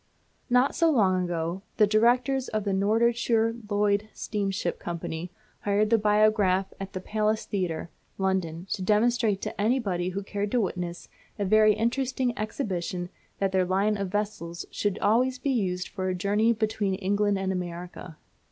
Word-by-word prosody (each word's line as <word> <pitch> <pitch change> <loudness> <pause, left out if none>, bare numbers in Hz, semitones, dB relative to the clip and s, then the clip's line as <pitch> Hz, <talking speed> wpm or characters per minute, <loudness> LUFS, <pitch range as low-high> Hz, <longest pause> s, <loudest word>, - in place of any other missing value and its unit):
Not 250 +3 +3
so 335 -1 +3
long 185 - +2
since, 170 +2 -2 0.2
the 215 - +6
directors 245 +5 +2
of 215 -2 -2
the 200 - -1
Norddeutscher 230 +3 +2
Lloyd 205 0 +1
Steamship 195 -4 -2
Company 170 0 -5 0.3
hired 205 +2 +1
the 230 - +5
biograph 210 -2 +3
at 195 0 -6
the 185 - -3
Palace 215 +2 -1
Theatre, 175 -4 -3 0.3
London, 185 -3 -1
to - - -2
demonstrate 215 +1 +2
to - - -4
anybody 205 -6 +1
who 195 +2 -4
cared 205 +1 -3
to 250 - +3
witness 175 -3 -4 0.3
a 205 - -1
very 215 +2 +5
interesting 245 +2 0
exhibition 185 -6 -3 0.3
that 195 -1 0
their 190 -1 +3
line 195 +4 +1
of 200 -1 -2
vessels 195 -4 -3
should 205 -1 -1
always 250 +4 +2
be 275 +2 -1
used 185 -7 -1
for 185 -2 -3
a 185 - -1
journey 205 +5 +2
between 215 -3 0
England 205 +1 +1
and 190 0 -1
America. 175 -2 -6
205 Hz, 155 wpm, -27 LUFS, 185-220 Hz, 0.3 s, the